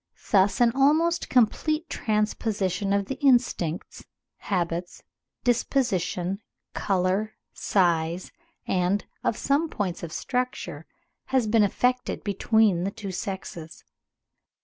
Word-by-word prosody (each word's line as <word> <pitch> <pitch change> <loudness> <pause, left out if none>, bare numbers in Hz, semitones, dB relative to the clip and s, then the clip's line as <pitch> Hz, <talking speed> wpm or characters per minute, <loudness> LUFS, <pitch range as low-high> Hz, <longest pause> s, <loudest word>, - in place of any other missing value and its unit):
Thus 195 -2 +4
an 240 -1 +5
almost 310 +6 +2
complete 305 +7 +2
transposition 210 - -1
of 200 0 +2
the 265 +6 -5
instincts, 235 - +1 0.3
habits, 175 -2 -3 0.4
disposition, 200 - 0 0.3
colour, 195 +2 0 0.2
size, 170 -2 +1 0.3
and 185 +2 0 0.2
of 220 - 0
some 290 +4 +1
points 185 - -3
of 170 - -6
structure, 250 +7 -3 0.4
has 260 -3 +1
been 220 +1 +3
effected 250 +5 0
between 205 -2 +2
the 195 - 0
two 200 -2 -7
sexes. 185 -4 -6
205 Hz, 100 wpm, -26 LUFS, 185-245 Hz, 0.4 s, an